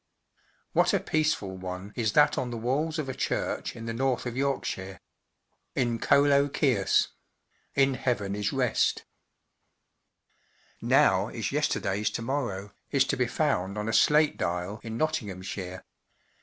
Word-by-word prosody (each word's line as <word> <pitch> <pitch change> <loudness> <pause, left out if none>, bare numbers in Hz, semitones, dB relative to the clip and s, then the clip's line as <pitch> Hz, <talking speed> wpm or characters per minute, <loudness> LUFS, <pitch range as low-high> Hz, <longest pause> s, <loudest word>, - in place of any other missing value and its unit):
What - - +3
a - - +2
peaceful 155 -12 0
one 95 +2 -7
is 110 -3 0
that 150 - +5
on 130 -2 -2
the 120 - -4
walls 145 +8 -1
of 155 -3 -2
a 130 - -3
church 135 - -2
in 115 - -8
the 115 - -3
north 130 +1 0
of 120 -1 -4
Yorkshire 110 -8 -2 0.4
:— - - -48
‘"In 120 -2 0
ccelo 140 +1 +4
quies 120 -12 +2 0.7
1T 140 - +6
(In 135 -1 +2
Htxtvn 100 -6 -1
11 - - -2 0.2
rest - - +2
j. - - -11
l - - -45 0.6
' - - -39
Now - - +4
is - - -4
yesterday 95 +1 0
s 105 - +1
to 115 - -4
morrow/" 115 -7 -3 0.2
is 135 -2 +3
to 135 - 0
be 125 -2 +1
found 105 - 0
on 105 +1 -3
a 115 - -1
slate 150 +6 +4
dial 90 +4 -2
in 115 0 -6
Nottinghamshire. 95 -10 -3
115 Hz, 165 wpm, -28 LUFS, 100-140 Hz, 0.7 s, 1T